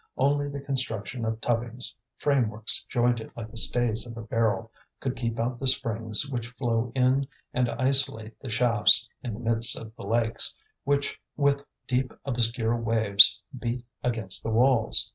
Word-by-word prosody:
Only 145 Hz, +1 st, +1 dB
the 140 Hz, 0 st, -6 dB
construction 130 Hz, -4 st, -4 dB
of 110 Hz, 0 st, -3 dB
tubbings, 120 Hz, 0 st, 0 dB, 0.2 s
frameworks 115 Hz, -6 st, +2 dB
jointed 120 Hz, -2 st, -1 dB
like 110 Hz, -2 st, -7 dB
the 115 Hz, -, -12 dB
stays 120 Hz, 0 st, +1 dB
of 115 Hz, -1 st, -10 dB
a 115 Hz, -, -7 dB
barrel, 115 Hz, 0 st, -1 dB, 0.3 s
could 130 Hz, -1 st, -3 dB
keep 115 Hz, -1 st, -4 dB
out 120 Hz, +1 st, -2 dB
the 135 Hz, -, -2 dB
springs 115 Hz, -1 st, +1 dB
which 120 Hz, -4 st, -4 dB
flow 120 Hz, -1 st, -2 dB
in 130 Hz, +1 st, +2 dB, 0.3 s
and 125 Hz, -1 st, 0 dB
isolate 125 Hz, -4 st, 0 dB
the 130 Hz, -, -8 dB
shafts 115 Hz, 0 st, +5 dB
in 120 Hz, -6 st, -5 dB
the -, -, -10 dB
midst 115 Hz, -1 st, +1 dB
of 110 Hz, 0 st, -10 dB
the -, -, -9 dB
lakes, 115 Hz, 0 st, +1 dB, 0.3 s
which 140 Hz, 0 st, -1 dB, 0.2 s
with 140 Hz, -1 st, +1 dB, 0.2 s
deep 130 Hz, 0 st, -2 dB
obscure 120 Hz, -2 st, +1 dB
waves 110 Hz, -1 st, +5 dB, 0.2 s
beat 120 Hz, 0 st, -4 dB, 0.2 s
against 115 Hz, -6 st, -1 dB
the -, -, -5 dB
walls. 120 Hz, +1 st, +3 dB
120 Hz, 160 wpm, -26 LUFS, 115-130 Hz, 0.3 s, shafts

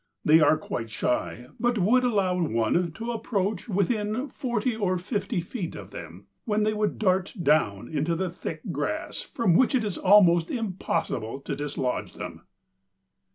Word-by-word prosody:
They 155 Hz, +2 st, +7 dB
are 155 Hz, 0 st, +5 dB
quite 115 Hz, -7 st, -5 dB
shy, 125 Hz, +2 st, -2 dB
but 240 Hz, -1 st, +1 dB
would 225 Hz, +7 st, +4 dB
allow 195 Hz, -7 st, +1 dB
one 155 Hz, +5 st, +1 dB
to 230 Hz, +5 st, -4 dB
approach 215 Hz, -3 st, -2 dB
within 210 Hz, +6 st, 0 dB
forty 240 Hz, -2 st, -1 dB
or 190 Hz, -4 st, 0 dB
fifty 200 Hz, +2 st, -2 dB
feet 175 Hz, 0 st, -5 dB
of -, -, -9 dB
them, -, -, -9 dB, 0.2 s
when 215 Hz, -2 st, +1 dB
they 215 Hz, 0 st, +2 dB
would 210 Hz, 0 st, -1 dB
dart 190 Hz, -1 st, +1 dB
down 115 Hz, -10 st, +2 dB
into 155 Hz, +4 st, -1 dB
the 180 Hz, +1 st, -2 dB
thick 180 Hz, -, -6 dB
grass, -, -, -3 dB
from 230 Hz, -8 st, 0 dB
which 260 Hz, +9 st, +4 dB
it 245 Hz, -, +2 dB
was 205 Hz, -4 st, -3 dB
almost 180 Hz, -4 st, +5 dB
impossible 175 Hz, -, -2 dB
to 140 Hz, -, -4 dB
dislodge 140 Hz, -3 st, -3 dB
them." -, -, -7 dB
185 Hz, 155 wpm, -26 LUFS, 160-220 Hz, 0.2 s, They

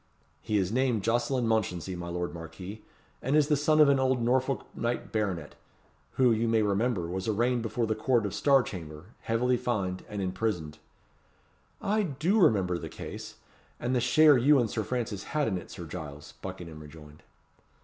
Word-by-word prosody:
"He 110 Hz, -2 st, 0 dB
is 95 Hz, -1 st, 0 dB
named 125 Hz, -4 st, +1 dB
Jocelyn 120 Hz, +3 st, +1 dB
Mounchensey, 95 Hz, -5 st, -1 dB
my 85 Hz, 0 st, -6 dB
lord 90 Hz, 0 st, -3 dB
Marquis; 90 Hz, +5 st, -8 dB, 0.4 s
and 135 Hz, +4 st, 0 dB
is 150 Hz, -1 st, +4 dB
the 150 Hz, -, +4 dB
son 155 Hz, +2 st, +2 dB
of 150 Hz, -, +8 dB
an 140 Hz, -1 st, +4 dB
old 130 Hz, -1 st, +2 dB
Norfolk 130 Hz, +3 st, +1 dB
knight 120 Hz, +1 st, -3 dB
baronet, 95 Hz, -8 st, -2 dB, 0.6 s
who, 125 Hz, -2 st, +4 dB
you 115 Hz, +1 st, +1 dB
may 115 Hz, -1 st, +3 dB
remember, 100 Hz, -2 st, 0 dB
was 95 Hz, +3 st, -4 dB
arraigned 120 Hz, +3 st, +1 dB
before 115 Hz, +1 st, -1 dB
the 110 Hz, -, 0 dB
Court 115 Hz, +1 st, +1 dB
of 100 Hz, -, -3 dB
Star 135 Hz, -2 st, +4 dB
Chamber, 80 Hz, -4 st, -9 dB
heavily 125 Hz, +2 st, +1 dB
fined, 100 Hz, -7 st, -2 dB
and 105 Hz, -1 st, -5 dB
imprisoned." 90 Hz, -5 st, -2 dB, 1.0 s
"I 215 Hz, +2 st, +2 dB
do 170 Hz, +4 st, +1 dB
remember 95 Hz, -, +3 dB
the -, -, -6 dB
case, -, -, -8 dB, 0.4 s
and 120 Hz, +2 st, -1 dB
the 125 Hz, -, +2 dB
share 145 Hz, +3 st, +6 dB
you 145 Hz, +4 st, +5 dB
and 120 Hz, -4 st, +1 dB
Sir 110 Hz, -, -1 dB
Francis 110 Hz, -4 st, -3 dB
had 150 Hz, -, +2 dB
in 95 Hz, -4 st, -1 dB
it, -, -, -12 dB
Sir 85 Hz, -, -8 dB
Giles," 75 Hz, -3 st, -8 dB
Buckingham 80 Hz, -3 st, -7 dB
rejoined. 75 Hz, 0 st, -13 dB
110 Hz, 180 wpm, -29 LUFS, 90-125 Hz, 1.0 s, of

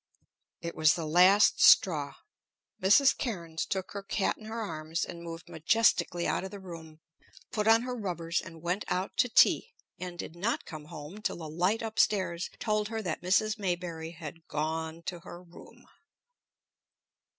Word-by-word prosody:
It 170 Hz, 0 st, -5 dB
was 155 Hz, 0 st, +4 dB
the 165 Hz, -2 st, -4 dB
last 180 Hz, +6 st, +5 dB
straw. -, -, +5 dB, 0.7 s
Mrs. 210 Hz, +9 st, +5 dB
Cairnes 170 Hz, -9 st, -4 dB
took 190 Hz, -1 st, -3 dB
her 200 Hz, -, -5 dB
cat 195 Hz, 0 st, -1 dB
in 215 Hz, -, -14 dB
her 225 Hz, +1 st, -5 dB
arms 160 Hz, -5 st, -3 dB
and 170 Hz, -1 st, -9 dB
moved 165 Hz, 0 st, -8 dB
majestically 175 Hz, +1 st, +2 dB
out -, -, 0 dB
of 190 Hz, -, -5 dB
the 200 Hz, +1 st, -9 dB
room, 165 Hz, -4 st, -11 dB, 0.5 s
put 210 Hz, -1 st, -1 dB
on 225 Hz, +1 st, +6 dB
her 250 Hz, 0 st, -4 dB
rubbers, 175 Hz, -6 st, -2 dB
and 165 Hz, -2 st, -12 dB
went 180 Hz, +4 st, -1 dB
out 185 Hz, +2 st, -2 dB
to 250 Hz, -, +3 dB
tea, -, -, +4 dB, 0.2 s
and 180 Hz, -1 st, -6 dB
did 170 Hz, -, -7 dB
not 205 Hz, +7 st, -1 dB
come 155 Hz, -2 st, -9 dB
home 155 Hz, +7 st, -9 dB
till -, -, -2 dB
the 160 Hz, -2 st, -7 dB
light 180 Hz, +9 st, 0 dB
up 220 Hz, -1 st, -4 dB
stairs 185 Hz, -4 st, +1 dB
told 210 Hz, -1 st, 0 dB
her 220 Hz, 0 st, -4 dB
that 170 Hz, -5 st, -3 dB
Mrs. 215 Hz, +4 st, +1 dB
Maybury 175 Hz, -4 st, -3 dB
had 165 Hz, 0 st, -10 dB
gone 160 Hz, +2 st, -3 dB
to 175 Hz, 0 st, -5 dB
her 175 Hz, 0 st, -11 dB
room. 175 Hz, -1 st, -16 dB
175 Hz, 170 wpm, -30 LUFS, 165-205 Hz, 0.7 s, on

